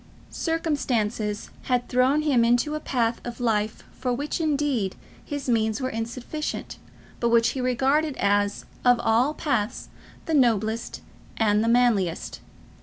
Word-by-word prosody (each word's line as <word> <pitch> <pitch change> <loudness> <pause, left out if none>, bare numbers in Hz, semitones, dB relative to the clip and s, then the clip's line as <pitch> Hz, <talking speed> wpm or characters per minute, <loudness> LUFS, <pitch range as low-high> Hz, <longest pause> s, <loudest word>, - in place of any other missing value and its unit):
Circumstances 240 -10 -1
had 250 -1 0
thrown 260 +4 +2
him 270 -6 +3
into 240 +5 +2
a 305 - -2
path 235 -5 -1
of 240 +1 -7
life 215 -3 0
for 250 - -3
which, 285 +6 -2
indeed, 285 - 0 0.3
his 285 -2 -5
means 220 -2 +1
were 260 -1 -2
insufficient, 240 +7 -5 0.4
but 235 - +1
which 230 0 +4
he 260 +1 -3
regarded 270 +4 +1
as, 205 0 +1 0.2
of 245 -1 +5
all 235 +6 +2
paths, 245 -7 -2 0.4
the 325 - -2
noblest 230 -4 +1 0.4
and 210 -1 +3
the - - 0
manliest. 230 -8 +1
245 Hz, 135 wpm, -25 LUFS, 225-275 Hz, 0.4 s, of